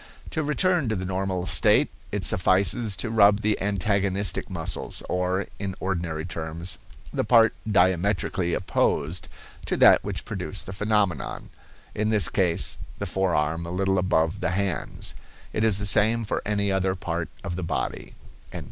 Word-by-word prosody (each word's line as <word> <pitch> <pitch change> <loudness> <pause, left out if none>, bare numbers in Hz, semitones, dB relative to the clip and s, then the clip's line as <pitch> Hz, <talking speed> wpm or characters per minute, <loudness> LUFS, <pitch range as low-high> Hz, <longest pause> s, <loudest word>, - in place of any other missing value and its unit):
To 160 - -1
return 155 - +1
to 110 - 0
the 95 -1 -3
normal 95 -1 -2
state, - - +3 0.2
it - - -2
suffices 95 +4 +2
to 115 +5 -2
rub 105 -2 +5
the 105 -1 0
antagonistic 100 0 0
muscles, - - -3
or, 90 +1 0
in 95 -2 -3
ordinary 85 -4 -2
terms, 85 0 -5 0.3
the - - 0
part 115 -2 +5 0.2
diametrically 90 -1 +2
opposed 80 +2 0 0.4
to - - 0
that - - +6
which - - -4
produced - - -3
the 95 - -7
phenomenon; 105 -5 -1 0.4
in 105 +1 0
this 105 -2 +2
case, 90 -4 0 0.2
the 100 - -4
forearm 85 -3 0
a - - -5
little 95 +1 +1
above 85 0 +1
the - - 0
hands. 95 -3 -3 0.4
It 110 - 0
is 110 -4 +4
the 105 - -2
same 110 +3 +3
for - - -2
any 100 -1 +1
other 95 -1 +1
part 85 -2 -3
of 85 - -4
the 90 - -4
body." 85 - -3
95 Hz, 155 wpm, -25 LUFS, 90-105 Hz, 0.4 s, that